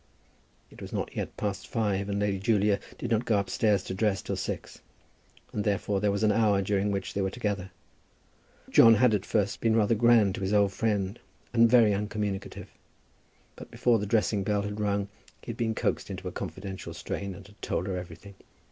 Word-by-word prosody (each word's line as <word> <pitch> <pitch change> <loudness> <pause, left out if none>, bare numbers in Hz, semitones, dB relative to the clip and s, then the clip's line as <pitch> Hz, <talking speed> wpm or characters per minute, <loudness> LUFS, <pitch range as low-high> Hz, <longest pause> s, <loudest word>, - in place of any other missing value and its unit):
It - - -14
was - - -8
not - - -4
yet - - -4
past 100 -2 -3
five, 100 -3 -1
and 100 - -1
Lady 100 -2 0
Julia 105 -1 +2 0.2
did 120 - -5
not 115 +1 +2
go 110 -4 +2
upstairs 100 0 +1
to - - -5
dress 100 0 0
till - - -3
six, - - -5 0.7
and 105 - -1
therefore 100 -1 0
there 105 - +2
was 100 +2 -1
an 105 - +4
hour 105 -2 +3
during 100 +1 0
which 100 -2 -3
they 100 - -1
were 95 - 0
together. 100 -4 -3 1.0
John 115 0 +8
had 115 +1 +4
at 100 -2 -1
first 100 -2 0
been 115 -1 +2
rather 110 0 +3
grand 115 -3 +4
to - - -6
his 95 +2 -1
old 100 -2 +3
friend, 105 -1 -1 0.3
and 115 -1 +5
very 115 -3 +5
uncommunicative. 105 -1 -4 0.8
But - - -11
before 120 -2 +2
the 105 - -3
dressing 105 -1 +1
bell 100 0 0
had 105 +1 -5
rung 100 -1 0 0.4
he - - -5
had - - -9
been 110 -1 -1
coaxed - - -1
into - - -6
a - - -4
confidential 95 0 -6
strain 100 -1 -5
and - - -12
had 105 +1 -19
told 90 - -2
everything. 90 +1 -6
105 Hz, 195 wpm, -28 LUFS, 100-110 Hz, 1.0 s, John